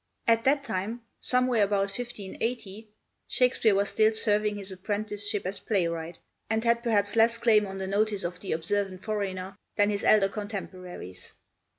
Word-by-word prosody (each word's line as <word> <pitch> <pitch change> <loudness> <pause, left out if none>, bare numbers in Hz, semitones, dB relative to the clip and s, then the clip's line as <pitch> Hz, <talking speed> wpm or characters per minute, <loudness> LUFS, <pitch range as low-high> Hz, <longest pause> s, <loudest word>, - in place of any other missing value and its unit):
At 230 0 +3
that 280 +1 +3
time 225 +1 -3 0.2
somewhere 250 -2 +2
about 200 -1 +1
1580 220 -1 -5 0.4
Shakespeare 245 -4 +3
was 200 +1 +1
still 215 +2 +3
serving 210 -1 +1
his 200 -1 -1
apprenticeship 205 +1 -2
as 190 +1 -1
playwright, 170 -4 -1 0.3
and 220 +1 0
had 235 0 +3
perhaps 210 -3 +2
less 230 +1 +4
claim 215 -3 +4
on 195 0 -6
the 190 - -3
notice 205 +1 +1
of 175 +1 -4
the 195 - -5
observant 185 +3 -1
foreigner 195 -3 -3 0.2
than 205 0 +3
his 200 -1 -2
elder 200 -2 +5
contemporaries. 185 - -7
205 Hz, 155 wpm, -28 LUFS, 195-225 Hz, 0.4 s, elder